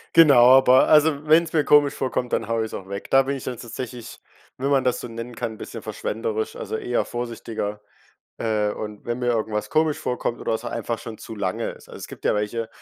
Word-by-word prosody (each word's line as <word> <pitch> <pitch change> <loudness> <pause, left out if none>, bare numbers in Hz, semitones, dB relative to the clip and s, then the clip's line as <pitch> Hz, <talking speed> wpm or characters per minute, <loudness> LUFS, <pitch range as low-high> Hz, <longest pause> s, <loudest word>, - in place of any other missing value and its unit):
Genau, 130 -5 +8
aber 130 0 +5
also 150 -1 +4
wenn's 165 +1 +4
mir 155 -2 +3
komisch 145 -1 +5
vorkommt, 125 -2 -2
dann 115 - 0
haue 115 -1 0
ich's - - -9
auch 95 0 -7
weg. 100 +1 -6
Da 135 - +7
bin 140 +1 -2
ich - - -10
dann 125 -2 -4
tatsächlich- 120 0 -7 0.4
wenn 135 +2 -1
man 135 -2 +3
das 125 -1 +1
so - - -6
nennen 115 +1 -7
kann- 110 -1 -4
bisschen - - -8
verschwenderisch, 110 0 -3
also - - -5
eher 120 - -1
vorsichtiger, 115 -3 -5 0.6
äh, 105 -2 0
und 105 0 -7
wenn 120 +1 -2
mir 125 -1 -1
irgendwas 110 -2 -1
komisch 155 -1 +2
vorkommt 125 -1 -2
oder - - -2
es 110 +2 -3
einfach 115 -1 -3
schon 115 -2 -8
zu 110 - -9
lange 95 -3 -2
ist. - - -14
Also - - -10
es - - -7
gibt - - -12
ja - - +3
welche, 110 +2 -2
120 Hz, 220 wpm, -23 LUFS, 110-135 Hz, 0.6 s, Genau